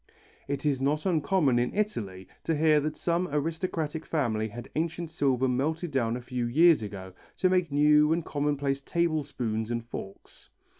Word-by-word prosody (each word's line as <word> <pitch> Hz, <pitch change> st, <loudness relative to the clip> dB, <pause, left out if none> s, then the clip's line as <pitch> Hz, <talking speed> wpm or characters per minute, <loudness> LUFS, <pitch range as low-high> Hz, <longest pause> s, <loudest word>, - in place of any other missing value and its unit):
It 140 Hz, +1 st, -3 dB
is 140 Hz, -3 st, +1 dB
not 150 Hz, +4 st, 0 dB
uncommon 155 Hz, -6 st, +2 dB
in 120 Hz, -, -1 dB
Italy, 100 Hz, -, -2 dB, 0.2 s
to 165 Hz, -, +1 dB
hear 155 Hz, 0 st, +4 dB
that 150 Hz, +1 st, -3 dB
some 175 Hz, +1 st, 0 dB
aristocratic 160 Hz, +1 st, -2 dB
family 115 Hz, -8 st, -1 dB
had 120 Hz, +3 st, -9 dB
ancient 165 Hz, +1 st, -2 dB
silver 135 Hz, -5 st, +1 dB
melted 155 Hz, +6 st, -1 dB
down 120 Hz, -4 st, 0 dB
a -, -, -7 dB
few 125 Hz, -1 st, -2 dB
years 160 Hz, +5 st, +5 dB
ago, 95 Hz, -3 st, -7 dB, 0.2 s
to 185 Hz, -, +3 dB
make 180 Hz, -4 st, +1 dB
new 150 Hz, +1 st, +5 dB
and 165 Hz, 0 st, 0 dB
commonplace 145 Hz, -1 st, -1 dB
table 170 Hz, 0 st, 0 dB
spoons 115 Hz, -6 st, -3 dB
and 115 Hz, -1 st, -3 dB
forks. 100 Hz, -4 st, -10 dB
145 Hz, 165 wpm, -28 LUFS, 125-160 Hz, 0.2 s, years